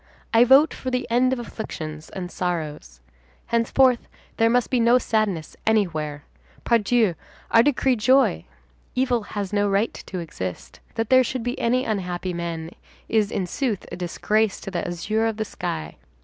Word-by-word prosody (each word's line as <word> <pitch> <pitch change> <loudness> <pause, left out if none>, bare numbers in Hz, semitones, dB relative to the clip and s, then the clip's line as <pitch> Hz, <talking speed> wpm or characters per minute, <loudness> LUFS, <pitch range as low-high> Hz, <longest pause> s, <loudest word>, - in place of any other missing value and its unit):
I 230 +2 +7
vote 275 +5 +6
for 260 - -5
the 250 0 -1
end 250 +2 +3
of 260 - 0
afflictions 155 -10 -6
and 180 -2 -6
sorrows. 155 - -4 0.4
Henceforth, 235 +2 +2 0.3
there 225 0 +4
must 245 +2 +1
be 255 - +2
no 235 +2 +5
sadness 215 -10 -1
anywhere. 155 -9 0 0.4
Pardieu, 230 -3 +3 0.4
I 230 - +7
decree 265 -1 +2
joy! 260 +5 +3 0.5
Evil 250 -2 +1
has 205 -1 -5
no 205 0 +2
right 200 +4 +1
to 185 - -5
exist. 95 - -6 0.2
That 225 0 -2
there 260 0 +7
should 255 -1 -3
be 245 +1 -3
any 250 +2 +1
unhappy 185 -3 -2
men 170 -1 -4 0.4
is, 215 -2 +2
in 195 - -2
sooth, 220 +2 -2
a - - -4
disgrace 210 +4 0
to 195 - -6
the 175 -1 -2
azure 215 +6 -1
of 220 -1 -2
the 220 - -1
sky. 80 - -5
215 Hz, 165 wpm, -23 LUFS, 175-245 Hz, 0.5 s, I